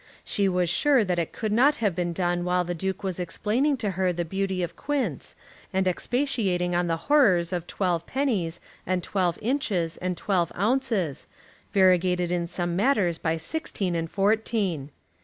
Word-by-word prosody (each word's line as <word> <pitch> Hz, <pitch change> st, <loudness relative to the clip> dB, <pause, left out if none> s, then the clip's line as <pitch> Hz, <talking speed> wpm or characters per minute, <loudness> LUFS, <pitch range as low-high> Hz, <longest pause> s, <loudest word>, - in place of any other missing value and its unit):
She 200 Hz, -1 st, +1 dB
was 180 Hz, -1 st, +1 dB
sure 260 Hz, -, +3 dB
that 180 Hz, -2 st, 0 dB
it 165 Hz, -, -2 dB
could 215 Hz, -2 st, -3 dB
not 265 Hz, +7 st, +4 dB
have 205 Hz, -6 st, 0 dB
been 175 Hz, -1 st, -1 dB
done 175 Hz, 0 st, 0 dB
while 180 Hz, 0 st, +1 dB
the 175 Hz, 0 st, -3 dB
Duke 190 Hz, +3 st, -3 dB
was 185 Hz, -2 st, -3 dB
explaining 230 Hz, -, 0 dB
to 210 Hz, -5 st, -2 dB
her 185 Hz, 0 st, +1 dB
the 175 Hz, 0 st, -2 dB
beauty 190 Hz, +1 st, -2 dB
of 170 Hz, -, -4 dB
quints, 290 Hz, -2 st, -2 dB, 0.4 s
and 190 Hz, 0 st, +1 dB
expatiating 190 Hz, -4 st, 0 dB
on 175 Hz, 0 st, +1 dB
the 165 Hz, -1 st, 0 dB
horrors 190 Hz, -, +4 dB
of 175 Hz, -1 st, -3 dB
twelve 175 Hz, -4 st, -1 dB
pennies, 210 Hz, -12 st, -1 dB, 0.3 s
and 185 Hz, -1 st, 0 dB
twelve 180 Hz, -3 st, 0 dB
inches, 210 Hz, -, 0 dB
and 180 Hz, -1 st, -3 dB
twelve 180 Hz, -5 st, 0 dB
ounces, 215 Hz, -, 0 dB, 0.4 s
variegated 180 Hz, -2 st, +3 dB
in 175 Hz, -1 st, 0 dB
some 175 Hz, 0 st, -2 dB
matters 195 Hz, -6 st, +2 dB
by 165 Hz, 0 st, 0 dB
sixteen 195 Hz, -, -2 dB
and 165 Hz, -1 st, -2 dB
fourteen! 200 Hz, -, 0 dB
185 Hz, 170 wpm, -26 LUFS, 175-215 Hz, 0.4 s, not